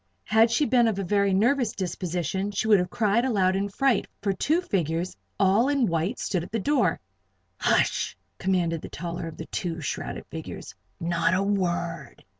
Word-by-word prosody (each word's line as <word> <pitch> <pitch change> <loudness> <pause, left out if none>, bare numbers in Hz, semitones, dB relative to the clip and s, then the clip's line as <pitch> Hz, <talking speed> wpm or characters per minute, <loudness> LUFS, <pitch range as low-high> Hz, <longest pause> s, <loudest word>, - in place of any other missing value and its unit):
Had 220 +2 +4
she 265 +6 +2
been 245 -3 +4
of 220 -3 0
a 195 - -1
very 200 +1 +2
nervous 235 +4 +2
disposition, 180 0 -2
she 205 +2 -2
would 210 -3 +6
have 180 - -1
cried 225 0 +2
aloud 195 -7 +2
in 200 +1 -1
fright, 270 +4 +1 0.2
for 200 -2 +1
two 310 - +1
figures 175 - -1 0.2
all 200 +7 +4
in 280 -4 +2
white 170 +5 -1
stood 180 -4 -1
at - - -10
the 225 - 0
door. 275 +5 +1 0.6
"Hush!" - - +1 0.2
commanded 175 -4 0
the - - -8
taller 170 0 -5
of 165 - -9
the 160 - -6
two 170 -1 -3
shrouded 150 - -4
figures. - - -8 0.3
"Not 170 +1 +1
a 190 - +1
word." 175 -7 -2
195 Hz, 180 wpm, -26 LUFS, 175-225 Hz, 0.6 s, would